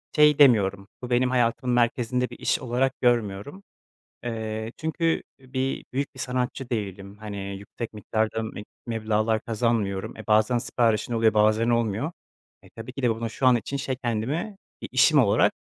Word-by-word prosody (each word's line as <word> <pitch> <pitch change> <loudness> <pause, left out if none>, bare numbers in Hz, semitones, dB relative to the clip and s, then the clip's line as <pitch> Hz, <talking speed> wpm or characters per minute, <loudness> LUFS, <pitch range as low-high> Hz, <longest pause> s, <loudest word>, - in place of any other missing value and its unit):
şey 150 -1 +5
demiyorum, 100 -7 +4
bu 125 - -6
benim 125 +1 +2
hayatımın 125 0 +1
merkezinde 125 +1 +1
bir - - -10
iş - - +1
olarak 130 +2 0
görmüyorum. 120 - 0 0.6
Eee, 110 -1 -4
çünkü, 165 +1 0 0.2
bir, 130 0 -3
büyük 140 +1 -2
bir 130 - -12
sanatçı 125 0 -2
değilim, 100 -3 -4
hani, 105 -2 -6 0.2
yüksek 110 +3 -7
miktarda 110 +1 -1
meb 105 -2 -6 0.2
meblağlar 110 -1 0
kazanmıyorum. 110 -5 -1
E, 110 - -10
bazen 110 +3 +3
siparişin 115 -1 0
oluyor, 115 -1 +3
bazen 110 +2 +3
olmuyor. 115 - 0 0.5
E, - - -17
tabii 115 +3 -9
ki 135 - -6
de 125 - +3
bunu 115 0 -2
şu 130 +3 0
an 125 - +6
için 135 +4 -3
şey 135 -1 -2
kendimi 130 - -2 0.3
bir - - -6
işim - - +5
olarak - - +4
115 Hz, 160 wpm, -25 LUFS, 110-130 Hz, 0.6 s, an